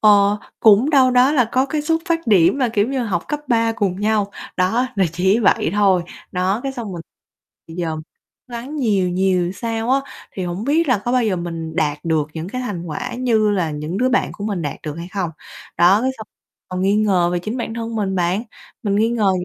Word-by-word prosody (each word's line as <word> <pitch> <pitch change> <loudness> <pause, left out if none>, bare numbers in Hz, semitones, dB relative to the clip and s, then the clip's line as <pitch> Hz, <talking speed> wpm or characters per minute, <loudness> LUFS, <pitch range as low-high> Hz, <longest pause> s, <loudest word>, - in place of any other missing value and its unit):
ờ, 205 -1 +5 0.2
cũng 220 +6 +5
đâu 265 -4 +5
đó 250 +3 +4
là 260 -5 +4
có 260 +1 +2
cái 300 +1 -2
xuất 325 +1 0
phát 330 -3 0
điểm 195 -1 +4
là, 255 -3 +2
kiểu 220 -1 +1
như, 265 -1 -1
học 180 -6 -2
cấp 295 -1 -2
3 230 -1 +2
cùng 200 -4 -2
nhau, 210 -1 +1 0.3
đó 210 +8 +2
là 195 - +3
chỉ 190 +5 +2
vậy 215 -7 +2
thôi. 195 -3 +3 0.3
Đó, 185 +4 0
cái 270 - -3
xong 230 -7 -6
mình 170 - -6 0.7
thì 165 - -9
giờ 165 -2 -2 0.6
gắng 245 +6 -6
nhiều 205 -9 +1
nhiều 180 -1 +1
sao 225 +3 -3
á 270 +1 +4 0.3
thì 190 - -4
hổng 175 +4 -4
biết 305 +4 +2
là 250 -5 +3
có 240 - 0
bao 250 -2 +3
giờ 205 -4 +1
mình 165 -2 -5
đạt 150 -5 0
được 160 -3 0
những 165 +2 -5
cái 255 +5 -4
thành 205 -8 -4
quả 245 +11 -4
như 230 -4 +2
là 180 -6 0
những 150 +4 -4
đứa 255 +2 +2
bạn 255 - +1
của 205 - -7
mình 200 -5 -2
đạt 145 -2 -3
được 150 -2 -5
hay 170 +1 -7
không. 185 -3 -3 0.5
Đó, 185 +6 +5
cái 260 - +1
xong 220 - -8 0.4
còn 185 0 -3
nghi 195 +2 +3
ngờ 190 -5 +2
về 175 - +1
chính 215 +7 -4
bản 235 -2 -4
thân 230 0 -4
mình 195 -3 -1
bạn, 180 +4 0 0.4
mình 200 -3 0
nghi 220 +2 +3
ngờ 220 -4 +2
205 Hz, 230 wpm, -20 LUFS, 180-240 Hz, 0.7 s, ờ